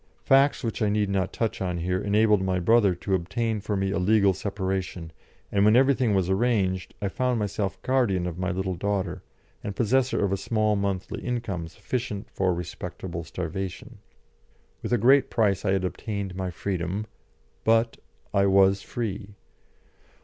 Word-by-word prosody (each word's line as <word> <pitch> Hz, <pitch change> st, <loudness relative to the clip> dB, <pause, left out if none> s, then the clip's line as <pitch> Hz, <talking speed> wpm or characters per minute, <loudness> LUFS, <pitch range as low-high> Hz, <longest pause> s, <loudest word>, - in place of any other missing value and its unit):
Facts 135 Hz, +1 st, +4 dB
which 115 Hz, -1 st, -3 dB
I 105 Hz, -, +3 dB
need 105 Hz, -1 st, +1 dB
not 95 Hz, -1 st, 0 dB
touch 115 Hz, -3 st, -2 dB
on 90 Hz, -2 st, -1 dB
here 90 Hz, +2 st, -1 dB
enabled 105 Hz, 0 st, +3 dB
my 95 Hz, -1 st, 0 dB
brother 100 Hz, 0 st, +4 dB
to 90 Hz, +3 st, -3 dB
obtain 105 Hz, +5 st, -1 dB
for 105 Hz, 0 st, -2 dB
me 95 Hz, 0 st, 0 dB
a 100 Hz, -, 0 dB
legal 100 Hz, +1 st, +4 dB
separation, 95 Hz, -3 st, -3 dB, 0.4 s
and 100 Hz, -1 st, +3 dB
when 105 Hz, +2 st, +5 dB
everything 130 Hz, -4 st, +4 dB
was 95 Hz, -2 st, +1 dB
arranged, 95 Hz, -2 st, 0 dB
I -, -, +1 dB
found 125 Hz, +5 st, 0 dB
myself 100 Hz, -2 st, -2 dB
guardian 120 Hz, -9 st, +1 dB
of 90 Hz, -1 st, -5 dB
my 95 Hz, 0 st, -1 dB
little 95 Hz, 0 st, -2 dB
daughter, 95 Hz, -1 st, -2 dB, 0.4 s
and 100 Hz, -, -4 dB
possessor 125 Hz, 0 st, +2 dB
of 95 Hz, -, -1 dB
a 100 Hz, -, +1 dB
small 110 Hz, 0 st, +1 dB
monthly 100 Hz, -2 st, -2 dB
income 115 Hz, -9 st, -3 dB
sufficient 105 Hz, +4 st, -4 dB
for 95 Hz, -1 st, +1 dB
respectable 85 Hz, 0 st, -5 dB
starvation. 90 Hz, +3 st, -5 dB, 0.8 s
With -, -, -5 dB
a 120 Hz, -, +4 dB
great 130 Hz, +5 st, +5 dB
price 105 Hz, -4 st, +1 dB
I 95 Hz, -, +2 dB
had 95 Hz, -1 st, 0 dB
obtained 100 Hz, 0 st, -4 dB
my 95 Hz, -1 st, -3 dB
freedom, 90 Hz, +3 st, -3 dB, 0.6 s
but 115 Hz, +1 st, +2 dB, 0.4 s
I 100 Hz, 0 st, +3 dB
was 95 Hz, 0 st, +4 dB
free. 100 Hz, -4 st, -5 dB
100 Hz, 165 wpm, -26 LUFS, 95-110 Hz, 0.8 s, when